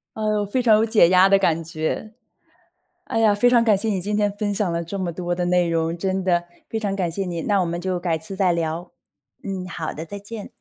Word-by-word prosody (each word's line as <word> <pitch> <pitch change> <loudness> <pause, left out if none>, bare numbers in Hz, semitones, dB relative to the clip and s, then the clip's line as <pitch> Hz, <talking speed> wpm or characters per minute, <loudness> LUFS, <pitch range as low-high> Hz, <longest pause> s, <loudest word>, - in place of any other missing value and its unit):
呃， 215 -1 0
非 205 +6 -1
常 220 -3 +5
有 220 - +3
解 215 -7 +5
压 185 +1 +6
的 195 - +5
感 165 -4 +1
觉。 160 +7 -3 0.9
哎 225 - -2
呀， 215 -2 +4
非 245 +4 +3
常 235 -1 +4
感 215 -3 +4
谢 225 - -1
你 200 -3 0
今 205 +3 -2
天 205 -1 +2
分 205 0 -2
享 200 -4 0
了 170 0 -2
这 195 +4 -5
么 185 -2 -2
多 175 +1 -3
的 175 0 -2
内 180 -1 +2
容， 165 0 0
真 190 +2 -1
的 175 -2 +2 0.2
非 225 - -3
常 205 -3 -2
感 180 -3 -1
谢 195 +4 -3
你， 170 -3 -4
那 200 -2 +1
我 180 - 0
们 170 +1 -3
就 185 -1 -2
改 170 -2 -1
次 190 +4 -3
再 185 -3 +2
聊。 165 +1 -3 0.5
嗯， 190 -2 -5
好 165 -3 -5
的， 160 - -6
再 200 +4 -7
见。 205 +1 -8
190 Hz, 265 characters per minute, -22 LUFS, 170-205 Hz, 0.9 s, 压